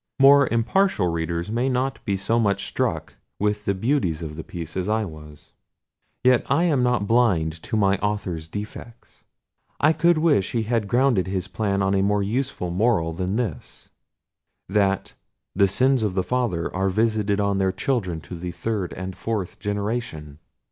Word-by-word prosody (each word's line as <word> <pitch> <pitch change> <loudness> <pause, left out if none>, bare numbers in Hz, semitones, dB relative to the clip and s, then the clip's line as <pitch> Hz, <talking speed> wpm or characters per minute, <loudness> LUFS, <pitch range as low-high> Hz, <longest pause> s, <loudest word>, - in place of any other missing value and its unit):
More 140 0 +7
impartial 115 - +1
readers 85 +3 -2
may 120 +4 0
not 130 +1 -1
be 100 -1 0
so 115 +5 0
much 100 -3 +1
struck - - -2 0.2
with 105 0 -1
the 100 - +1
beauties 95 - 0
of 75 -1 -6
this 80 - -8
piece 85 -2 -7
as 95 +1 -2
I 110 0 +1
was. 75 -4 -12 0.7
Yet 125 -1 +4
I 170 - +3
am 150 -7 +2
not 125 -4 +1
blind 90 -9 +2
to 110 - -3
my 100 -2 +2
author's 95 -6 -2
defects. 105 +5 -9 0.5
I 155 +2 +4
could 170 +1 +3
wish 145 - +2
he 115 -2 +1
had 110 -2 -1
grounded 120 -4 +2
his 95 -1 -2
plan 100 -1 -1
on 95 0 +1
a 95 - +2
more 100 +1 +2
useful 115 -4 -2
moral 90 -4 +1
than 95 +4 -2
this: 110 -10 -5 0.8
that 95 -1 0 0.4
"the 100 +1 +4
sins 130 +6 +2
of 95 -3 0
fathers 115 -10 -1
are 95 +1 0
visited 105 0 +1
on 100 -1 +1
their 95 -1 +2
children 95 - -2
to 90 - -9
the 90 +1 -4
third 95 +2 -3
and 95 0 -6
fourth 105 -6 -4
generation." 100 -8 -4
100 Hz, 170 wpm, -23 LUFS, 90-120 Hz, 0.8 s, More